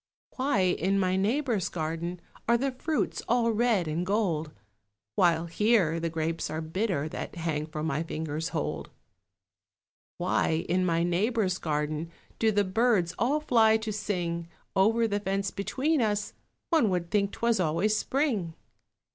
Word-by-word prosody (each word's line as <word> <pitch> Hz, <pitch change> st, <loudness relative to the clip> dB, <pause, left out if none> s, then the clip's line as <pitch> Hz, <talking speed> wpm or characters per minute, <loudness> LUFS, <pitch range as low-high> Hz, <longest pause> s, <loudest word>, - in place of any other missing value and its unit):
Why 260 Hz, -6 st, +2 dB
in 185 Hz, +1 st, +1 dB
my 185 Hz, -1 st, +2 dB
neighbour's 220 Hz, -, 0 dB
garden 170 Hz, +2 st, -3 dB, 0.3 s
Are 235 Hz, -, +5 dB
the 270 Hz, +3 st, 0 dB
fruits 300 Hz, +4 st, -2 dB
all 235 Hz, -1 st, +3 dB
red 220 Hz, -6 st, +2 dB
and 155 Hz, +3 st, -1 dB
gold, 180 Hz, -6 st, 0 dB, 0.6 s
While 170 Hz, +1 st, +3 dB
here 170 Hz, -2 st, +2 dB
the 165 Hz, 0 st, -1 dB
grapes 165 Hz, 0 st, -2 dB
are 155 Hz, -, -3 dB
bitter 165 Hz, -1 st, -1 dB
That -, -, -6 dB
hang 160 Hz, -3 st, -2 dB
for 155 Hz, -1 st, -5 dB
my 155 Hz, -1 st, 0 dB
fingers' 160 Hz, -1 st, -3 dB
hold? 160 Hz, -3 st, -3 dB, 1.3 s
Why 160 Hz, 0 st, +1 dB
in 185 Hz, +1 st, +1 dB
my 165 Hz, 0 st, +2 dB
neighbour's 185 Hz, +2 st, +1 dB
garden 150 Hz, +1 st, -2 dB, 0.3 s
Do 220 Hz, -1 st, +3 dB
the 205 Hz, -1 st, +2 dB
birds 200 Hz, -3 st, +2 dB
all 285 Hz, +6 st, +2 dB
fly 225 Hz, -6 st, +4 dB
to 220 Hz, -1 st, -4 dB
sing? 175 Hz, -5 st, -2 dB, 0.3 s
Over 225 Hz, +4 st, +3 dB
the 205 Hz, -1 st, -1 dB
fence 195 Hz, 0 st, -1 dB
between 260 Hz, -, 0 dB
us 210 Hz, -2 st, 0 dB, 0.4 s
One 315 Hz, -10 st, +4 dB
would 175 Hz, -2 st, -2 dB
think 200 Hz, -1 st, +2 dB
'twas 235 Hz, -3 st, +1 dB
always 180 Hz, +5 st, +2 dB
spring. 220 Hz, -, 0 dB
190 Hz, 145 wpm, -28 LUFS, 165-225 Hz, 1.3 s, Are